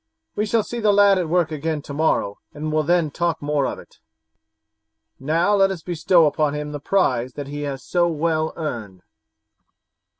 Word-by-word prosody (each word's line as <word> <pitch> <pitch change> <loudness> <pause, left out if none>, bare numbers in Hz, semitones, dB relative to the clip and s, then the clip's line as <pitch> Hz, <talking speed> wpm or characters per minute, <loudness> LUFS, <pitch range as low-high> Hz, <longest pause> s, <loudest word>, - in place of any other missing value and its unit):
We 210 +1 -1
shall 225 +1 +2
see 240 - -5
the 210 -2 +3
lad 200 -1 +5
at 170 -3 -2
work 175 -1 +1
again 155 0 -3
tomorrow 140 -9 -1 0.2
and 155 +1 -4
will 155 0 +2
then 165 -1 +1
talk 170 +1 -1
more 145 -2 0
of - - -4
it. - - -16 1.2
Now 165 +8 +1
let 195 -1 +4
us 180 -5 -5
bestow 170 -1 +3
upon 150 0 +1
him 150 0 -4
the 145 - -5
prize 130 -8 0
that 140 -1 -7
he 145 +1 -5
has 135 -1 -6
so 175 -1 +1
well 160 -1 0
earned." 110 - -6
155 Hz, 175 wpm, -22 LUFS, 145-175 Hz, 1.2 s, lad